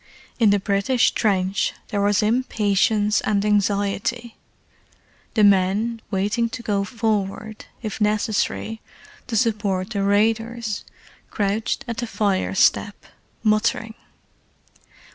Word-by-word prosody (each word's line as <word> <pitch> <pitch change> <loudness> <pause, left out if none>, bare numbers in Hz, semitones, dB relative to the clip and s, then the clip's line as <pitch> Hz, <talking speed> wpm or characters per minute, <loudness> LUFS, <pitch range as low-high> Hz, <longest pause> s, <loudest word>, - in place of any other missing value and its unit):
In 225 -3 +5
the 205 0 +3
British 200 +5 +2
trench 195 -3 0 0.2
there 205 - -1
was 205 +1 +2
impatience 210 -2 +1
and 205 -1 0
anxiety. 205 +3 0 1.0
The 215 - +4
men 205 +4 +3
waiting 210 +4 0
to 235 +1 -7
go 200 -3 0
forward, 215 -1 -3 0.2
if 215 0 -5
necessary, 215 +1 0 0.5
to 230 -3 -1
support 205 -4 0
the 200 -3 -1
raiders, 225 +2 0 0.5
crouched 210 +2 -1
at 230 -1 -4
the 240 - -3
fire 200 -4 0
step, 205 +1 +3 0.5
muttering. 220 +1 +1
210 Hz, 105 wpm, -22 LUFS, 200-225 Hz, 1.0 s, In